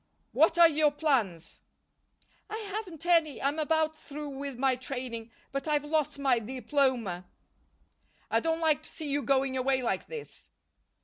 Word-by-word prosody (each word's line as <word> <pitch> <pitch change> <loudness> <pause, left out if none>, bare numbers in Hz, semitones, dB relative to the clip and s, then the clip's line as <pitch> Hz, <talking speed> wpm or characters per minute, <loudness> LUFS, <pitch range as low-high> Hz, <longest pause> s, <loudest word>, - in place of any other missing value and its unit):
"What 320 +7 +4
are 340 -1 +9
your 305 -1 +3
plans?" 245 - -1 0.9
"I 430 - -4
haven't 400 -6 -6
any. 330 -4 +3
I'm 285 +3 0
about 315 0 +1
through 295 -1 -7
with 275 -1 -6
my 265 0 +2
training, 250 -3 -5 0.2
but 275 +2 -3
I've 295 -1 +1
lost 300 -1 0
my 270 -4 +2
diploma." 245 -6 -1 1.0
"I - - +4
don't 325 0 -1
like 310 -2 +3
to - - -9
see 300 -3 -5
you 290 +1 +1
going 270 -1 +1
away 260 0 +1
like 235 - -1
this." 470 -2 -9
285 Hz, 150 wpm, -29 LUFS, 260-315 Hz, 1.0 s, are